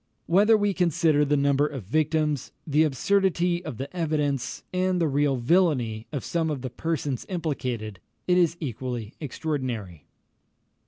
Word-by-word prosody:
Whether 210 +5 +5
we 205 -1 +1
consider 165 -4 +2
the 145 0 +2
number 140 +1 +3
of 135 -6 -6
victims, 150 - 0
the 150 0 +2
absurdity 175 +3 +2
of 115 - -6
the 135 +8 -6
evidence, 150 -6 -1
and 185 0 +1
the 165 - +2
real 145 -1 +2
villany 125 -6 +1
of 145 -4 -3
some 165 -2 0
of 140 -4 -3
the 130 - -4
persons 145 -2 -2
implicated, 125 - -3 0.3
it 180 - +4
is 170 -1 +2
equally 125 -5 -4
extraordinary. 130 - -4
150 Hz, 145 wpm, -26 LUFS, 130-170 Hz, 0.3 s, Whether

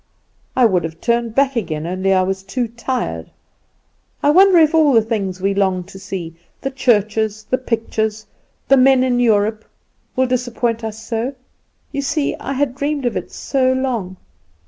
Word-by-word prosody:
I 255 - +5
would 185 -6 +2
have 165 0 -6
turned 235 -1 0
back 275 -1 +2
again, 155 -9 -2
only 185 +2 -1
I 185 -1 +4
was 190 +1 -2
too 235 +6 -2
tired. 240 +2 -3 0.9
I 290 - +5
wonder 380 +2 +6
if 315 -1 +5
all 310 -4 +4
the 225 - +6
things 200 -5 -3
we 195 +1 0
long 190 -2 +1
to 190 +1 -12
see 185 -4 -6 0.3
the 270 - -3
churches, 215 -4 +1
the 255 - 0
pictures, 220 -3 -2 0.4
the 275 - +5
men 260 0 +5
in 250 -1 +1
Europe 220 -2 +2 0.5
will 260 - +3
disappoint 245 -2 -1
us 220 0 -6
so! 235 +5 -2 0.6
You 280 - -2
see 285 +1 -1
I 275 - -4
had 275 -1 0
dreamed 285 0 -2
of 240 - 0
it - - -4
so 260 -2 0
long. 235 -8 -2
230 Hz, 170 wpm, -19 LUFS, 200-260 Hz, 0.9 s, wonder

